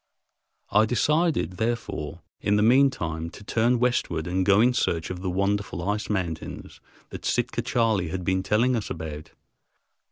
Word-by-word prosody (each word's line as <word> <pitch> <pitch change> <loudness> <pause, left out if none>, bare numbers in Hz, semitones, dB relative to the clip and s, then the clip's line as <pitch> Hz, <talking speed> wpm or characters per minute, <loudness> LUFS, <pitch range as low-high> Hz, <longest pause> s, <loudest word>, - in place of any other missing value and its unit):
I 105 +2 +4
decided, 150 - +1
therefore, 90 -9 -3 0.2
in 100 - +1
the 105 - +3
mean 130 +5 +6
time, 80 -7 -4
to 100 - -13
turn 115 +4 +2
westward 120 -10 0
and 95 +1 0
go 100 +2 +4
in 125 +3 +4
search 85 -8 -1
of 90 -1 -6
the 95 - -2
wonderful 100 -2 -1
"ice 105 +1 -1
mountains" 90 -6 -4 0.3
that - - -8
Sitka - - 0
Charley 110 -7 +1
had 90 +3 -4
been 95 +1 +1
telling 115 +6 +2
us 110 -3 -3
about. 75 -1 -6
100 Hz, 160 wpm, -25 LUFS, 90-115 Hz, 0.3 s, mean